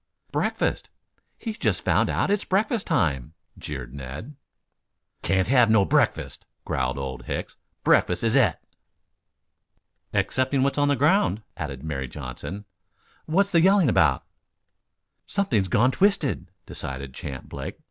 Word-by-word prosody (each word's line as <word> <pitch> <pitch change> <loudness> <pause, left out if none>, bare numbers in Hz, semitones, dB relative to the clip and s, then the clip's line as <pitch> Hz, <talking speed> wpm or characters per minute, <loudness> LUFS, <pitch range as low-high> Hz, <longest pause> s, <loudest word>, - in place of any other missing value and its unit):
"Breakfast. - - -1 0.5
He's 225 -1 -6
just - - 0
found - - +2
out - - 0
it's 205 - +1
breakfast 210 +3 0
time," 75 -3 0 0.2
jeered 65 -4 -7
Ned. 70 - -8 0.9
"Can't 95 -1 +1
have 125 -2 +5
no 110 -3 +5
breakfast," - - 0 0.2
growled 65 +1 -1
Old 65 -1 -5
Hicks. - - -4 0.3
"Breakfast 90 - +3
is 115 +2 +2
et." 115 - +3 1.5
"Excepting 130 +1 +1
what's 140 +1 +1
on 145 - +3
the 145 - +3
ground," 145 - +2
added 65 - -6
Mary 70 -4 -3
Johnson. 75 +9 -7 0.6
"What's 195 +5 +2
he 170 - +5
yelling 190 -3 +5
about?" - - +3 1.0
"Something's 120 - +1
gone 120 +8 +3
twisted," 165 - +1 0.2
decided 65 0 -6
Champ 65 0 -7
Blake. - - -7
110 Hz, 125 wpm, -25 LUFS, -, 1.5 s, have